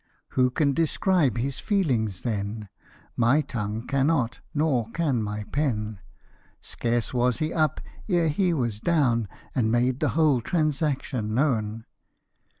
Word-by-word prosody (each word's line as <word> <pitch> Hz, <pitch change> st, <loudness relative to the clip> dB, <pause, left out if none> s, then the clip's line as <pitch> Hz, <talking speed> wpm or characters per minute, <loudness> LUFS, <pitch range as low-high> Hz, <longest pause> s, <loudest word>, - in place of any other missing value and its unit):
Who 125 Hz, -1 st, +2 dB
can 140 Hz, +2 st, +1 dB
describe 165 Hz, -3 st, +2 dB
his 130 Hz, +2 st, -2 dB
feelings 120 Hz, -, 0 dB
then? 105 Hz, -2 st, -3 dB, 0.5 s
My 125 Hz, +6 st, +4 dB
tongue 110 Hz, -4 st, -4 dB
cannot, 140 Hz, -3 st, +1 dB
nor 145 Hz, -7 st, +1 dB
can 140 Hz, -4 st, 0 dB
my 105 Hz, 0 st, -3 dB
pen: 110 Hz, -8 st, -1 dB, 0.6 s
Scarce 120 Hz, 0 st, -2 dB
was 125 Hz, -1 st, +2 dB
he 155 Hz, 0 st, -1 dB
up, 155 Hz, -3 st, +1 dB, 0.3 s
ere 175 Hz, -3 st, +3 dB
he 180 Hz, +4 st, +1 dB
was 120 Hz, -9 st, -1 dB
down, 125 Hz, -7 st, +2 dB, 0.3 s
And 115 Hz, -4 st, +1 dB
made 125 Hz, +2 st, +1 dB
the -, -, +1 dB
whole 150 Hz, -6 st, +4 dB
transaction 140 Hz, -7 st, -1 dB
known. 115 Hz, -5 st, 0 dB
125 Hz, 130 wpm, -26 LUFS, 115-155 Hz, 0.6 s, My